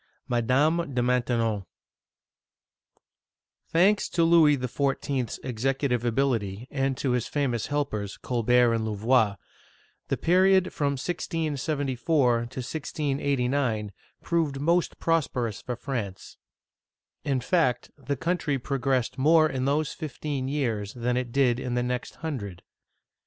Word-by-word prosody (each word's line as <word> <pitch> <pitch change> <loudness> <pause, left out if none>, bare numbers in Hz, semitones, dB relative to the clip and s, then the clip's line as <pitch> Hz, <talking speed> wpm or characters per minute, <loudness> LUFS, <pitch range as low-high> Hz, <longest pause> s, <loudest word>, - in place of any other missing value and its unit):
MADAME 135 +6 +1
DE 125 - +2
MAINTENON 120 -4 +1 2.1
THANKS 195 +5 +3
to 170 - +1
Louis 165 -3 +5
XIV/s 135 0 -2
executive 130 0 -1
ability, 120 -3 0
and 135 -2 0
to 130 - -1
his 125 -2 0
famous 130 -6 -1
helpers, 110 -9 -2
Colbert 120 0 +2
and 115 -1 0
Louvois, 110 0 +2 0.7
the - - -1
period 185 +1 +3
from 140 -1 0
1674 145 -3 -1
to 120 -1 +3
1689 135 - -2 0.3
proved 160 -5 0
most 170 +4 +1
prosperous 125 - 0
for 125 - -4
France. 110 -8 -5 0.9
In 140 -3 0
fact, 125 -3 +1
the 140 -1 -4
country 165 -3 0
progressed 130 -1 -1
more 155 +3 +5
in 130 -3 -2
those 145 +2 0
fifteen 145 -4 -4
years 115 -8 -2
than 120 0 -1
it 125 -1 -2
did 125 -2 +2
in 125 -1 -3
the 120 - +1
next 125 0 -3
hundred. 105 - -5
130 Hz, 115 wpm, -26 LUFS, 120-150 Hz, 2.1 s, Louis